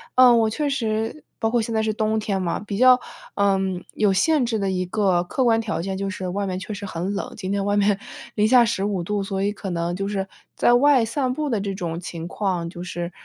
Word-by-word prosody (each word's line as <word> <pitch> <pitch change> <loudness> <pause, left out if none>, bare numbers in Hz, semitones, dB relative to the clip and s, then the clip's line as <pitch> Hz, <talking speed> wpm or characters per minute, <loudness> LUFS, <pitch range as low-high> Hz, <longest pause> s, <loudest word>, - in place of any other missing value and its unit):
嗯， 250 -2 +7
我 220 -1 +2
确 290 +7 -1
实 225 +1 -2 0.2
包 225 - +1
括 240 -1 +2
现 225 +1 -3
在 220 - +2
是 215 0 0
冬 220 0 0
天 200 -3 -1
嘛， 170 -2 -1
比 205 -1 -5
较， 255 +1 +7 0.4
嗯， 190 -2 +1
有 210 -2 +2
限 285 +8 +3
制 230 -2 -1
的 195 -1 0
一 185 -1 -1
个 185 -2 +1
客 260 +9 -1
观 225 -1 +4
条 215 -6 -3
件 190 +2 -3
就 195 0 -2
是 190 -2 -5
外 200 +3 -2
面 185 -1 -2
确 210 - -6
实 200 0 -6
很 185 +1 -3
冷， 200 - -4
今 190 -3 -5
天 200 0 0
外 205 0 +1
面 205 -1 +3 0.4
-15 210 -3 +3
度， 205 +3 -1
所 195 0 -3
以 205 - +1
可 200 -1 -6
能 170 0 -2
就 195 +2 -3
是 195 -1 -2 0.3
在 240 - +4
外 260 -1 +5
散 255 +2 -1
步 300 +2 -2
的 225 -5 0
这 200 0 -3
种 170 -3 -4
情 170 -1 -6
况 180 -2 -2
就 175 0 -8
是， 175 -1 -5
205 Hz, 250 characters per minute, -23 LUFS, 190-225 Hz, 0.4 s, 嗯